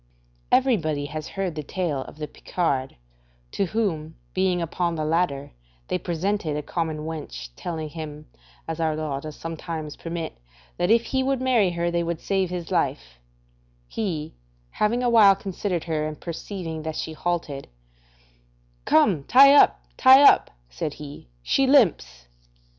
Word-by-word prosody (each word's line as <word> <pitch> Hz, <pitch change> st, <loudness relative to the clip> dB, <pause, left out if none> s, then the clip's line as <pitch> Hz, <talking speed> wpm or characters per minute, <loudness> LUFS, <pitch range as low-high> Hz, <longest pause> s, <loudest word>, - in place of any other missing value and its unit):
Everybody 170 Hz, -, +2 dB
has 155 Hz, +1 st, -6 dB
heard 195 Hz, -3 st, -3 dB
the 155 Hz, -, -4 dB
tale 150 Hz, -2 st, -2 dB
of -, -, -13 dB
the 150 Hz, -1 st, -5 dB
Picard, 135 Hz, -8 st, -2 dB, 0.6 s
to 195 Hz, -, 0 dB
whom, 170 Hz, -7 st, -2 dB, 0.2 s
being 185 Hz, -1 st, +1 dB
upon 170 Hz, +1 st, -1 dB
the 155 Hz, -1 st, -2 dB
ladder, 155 Hz, -4 st, 0 dB, 0.4 s
they -, -, 0 dB
presented 175 Hz, -2 st, -2 dB
a 150 Hz, -, -4 dB
common 160 Hz, -2 st, -3 dB
wench, 150 Hz, -, -6 dB
telling 160 Hz, -3 st, -4 dB
him 150 Hz, -1 st, -8 dB, 0.4 s
(as 165 Hz, 0 st, -4 dB
our 160 Hz, -1 st, +1 dB
law 155 Hz, -3 st, -3 dB
does 155 Hz, +1 st, -8 dB
some 165 Hz, 0 st, -6 dB
times 155 Hz, -2 st, -6 dB
permit) 165 Hz, -, -6 dB, 0.4 s
that 175 Hz, +1 st, 0 dB
if 230 Hz, +1 st, +5 dB
he 265 Hz, +2 st, -1 dB
would 270 Hz, 0 st, 0 dB
marry 250 Hz, -7 st, +3 dB
her 170 Hz, 0 st, -1 dB
they 170 Hz, 0 st, 0 dB
would 170 Hz, -1 st, -3 dB
save 190 Hz, -2 st, 0 dB
his 175 Hz, -2 st, -5 dB
life; -, -, -1 dB, 0.7 s
he, 165 Hz, -, -3 dB, 0.4 s
having 235 Hz, +4 st, 0 dB
a 245 Hz, -, +3 dB
while 205 Hz, -4 st, +7 dB
considered 190 Hz, -2 st, -3 dB
her 155 Hz, -2 st, -1 dB
and 155 Hz, -1 st, -7 dB
perceiving 170 Hz, -1 st, -6 dB
that 160 Hz, 0 st, -5 dB
she 160 Hz, -, -4 dB
halted: 155 Hz, -4 st, -3 dB, 1.2 s
"Come, 155 Hz, -2 st, +3 dB
tie 275 Hz, +3 st, +8 dB
up, 290 Hz, -, +5 dB, 0.2 s
tie 265 Hz, +2 st, +8 dB
up," -, -, +6 dB, 0.2 s
said -, -, -5 dB
he, 145 Hz, -, -10 dB, 0.2 s
"she 270 Hz, -, +2 dB
limps." 175 Hz, -, +3 dB
165 Hz, 155 wpm, -24 LUFS, 155-195 Hz, 1.2 s, tie